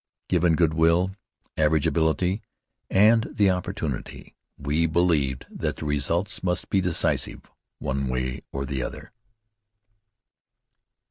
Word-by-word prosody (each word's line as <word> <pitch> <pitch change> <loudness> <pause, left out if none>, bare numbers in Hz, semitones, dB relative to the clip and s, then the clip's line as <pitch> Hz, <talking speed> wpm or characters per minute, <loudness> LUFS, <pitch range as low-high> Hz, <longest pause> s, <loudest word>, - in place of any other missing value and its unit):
Given 85 -2 +3
good 80 -1 +2
will, 85 +4 +2 0.4
average 75 -1 +2
ability, 85 +5 +1 0.5
and 110 +3 +5
the 100 -2 +3
opportunity, 80 -7 -4 0.2
we 75 +4 0
believed 80 -6 +1
that - - -3
the - - -7
results 80 - -1
must 90 -1 -1
be 95 - +3
decisive, 90 -3 -1 0.3
one 70 0 -2
way 65 0 -2
or 70 0 -3
the 65 -1 -3
other. - - -7
80 Hz, 115 wpm, -25 LUFS, 70-90 Hz, 0.5 s, and